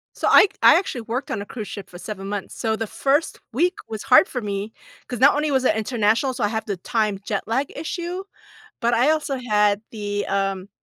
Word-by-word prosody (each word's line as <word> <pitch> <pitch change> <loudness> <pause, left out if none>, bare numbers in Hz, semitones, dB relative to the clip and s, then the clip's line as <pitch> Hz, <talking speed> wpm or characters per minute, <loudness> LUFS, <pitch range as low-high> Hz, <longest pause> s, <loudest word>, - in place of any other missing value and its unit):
So - - -1
I 410 - +8
I - - +8
actually 260 -10 -3
worked 235 +4 -4
on 210 - -2
a 205 - -6
cruise 215 -3 -7
ship 195 -3 -8
for 175 - -11
7 195 0 -7
months, 200 -1 -5
so 220 -2 0
the 225 0 -4
1st 280 +8 0
week 350 - +2
was 220 -1 -6
hard 255 +9 +6
for 250 - -4
me 205 +1 -4 0.3
'cause 245 - -5
not 280 +2 +7
only 300 0 0
was 265 -2 +2
it 215 - +3
international, 225 +3 +1
so 245 - -3
I 205 - +2
have 220 0 -3
the 200 - -2
time 210 0 -1
jet 205 -3 -2
lag 265 +5 -1
issue, 345 +4 -4 0.6
but 235 -1 +2
I 250 +6 +4
also 300 -3 0
had 210 -1 +3
the, 205 -2 -3
um 195 -1 -1
225 Hz, 220 wpm, -22 LUFS, 205-270 Hz, 0.6 s, I